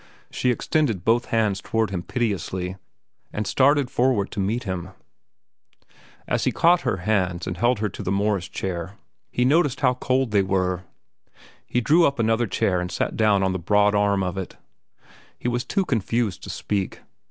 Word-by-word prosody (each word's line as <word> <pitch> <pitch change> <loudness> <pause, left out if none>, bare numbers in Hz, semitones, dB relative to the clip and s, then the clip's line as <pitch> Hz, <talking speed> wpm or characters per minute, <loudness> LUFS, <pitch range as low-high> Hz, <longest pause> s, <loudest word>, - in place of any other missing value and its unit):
She 125 - 0
extended 125 - 0
both 120 +2 +3
hands 105 -4 0
toward 110 -2 -1
him 90 -3 -2
piteously, 95 -4 -2 0.6
and 105 - -3
started 135 +4 +3
forward 120 -5 +1
to - - -5
meet 110 +6 -1
him. 95 -3 -4 1.4
As - - 0
he - - +2
caught 175 +1 +4
her 120 -7 -1
hands 95 -5 0
and 90 0 -5
led 120 0 +3
her 105 0 -1
to 100 - -8
the 95 -2 -2
Morris 100 -2 0
chair 90 0 -4 0.3
he 125 - 0
noticed 145 -1 +2
how 125 - +4
cold 130 -1 0
they 100 -2 +4
were. 95 -1 -1 0.8
He 125 - 0
drew 160 +7 +5
up 140 - -2
another 115 +1 +1
chair 90 -2 0
and 90 0 -4
sat - - -2
down 105 -3 +3
on 95 0 +1
the 95 - -2
broad 105 +4 +3
arm 100 -1 +2
of 90 +1 -2
it. 95 - -7 0.8
He - - -4
was 120 0 0
too 195 - -1
confused 115 - -1
to - - -9
speak. 100 -2 -3
105 Hz, 175 wpm, -24 LUFS, 95-120 Hz, 1.4 s, drew